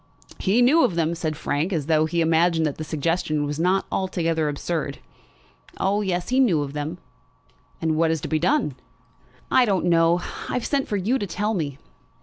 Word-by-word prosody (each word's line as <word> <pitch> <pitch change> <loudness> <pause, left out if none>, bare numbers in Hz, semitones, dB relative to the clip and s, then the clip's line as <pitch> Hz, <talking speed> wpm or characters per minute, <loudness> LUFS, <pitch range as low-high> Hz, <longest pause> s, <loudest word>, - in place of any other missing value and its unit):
"He 215 +6 +3
knew 305 +7 +5
of 175 - +1
them," 165 0 +1
said 160 -3 -3
Frank, 150 +7 -1
as 160 -6 -1
though 155 0 +2
he 170 +1 0
imagined 165 0 +3
that 150 -1 -3
the - - -3
suggestion 155 -1 -1
was 145 +1 -4
not 185 +3 +2
altogether 165 -5 0
absurd. 145 0 -3 0.8
"Oh, 200 +2 +1
yes; 180 -3 -2
he 255 +1 +2
knew 180 - +3
of 140 -1 -7
them." 150 +3 -4 0.8
"And 160 -1 0
what 165 +1 +2
is 160 0 0
to - - -4
be 155 - 0
done?" 270 - +1 0.8
"I 255 - +5
don't 195 -6 +1
know. 170 0 +4 0.3
I've 250 - -2
sent 280 -2 0
for 205 - -1
you 225 +8 0
to 205 - -3
tell 210 +4 -1
me." 145 -8 -3
165 Hz, 190 wpm, -23 LUFS, 155-195 Hz, 0.8 s, knew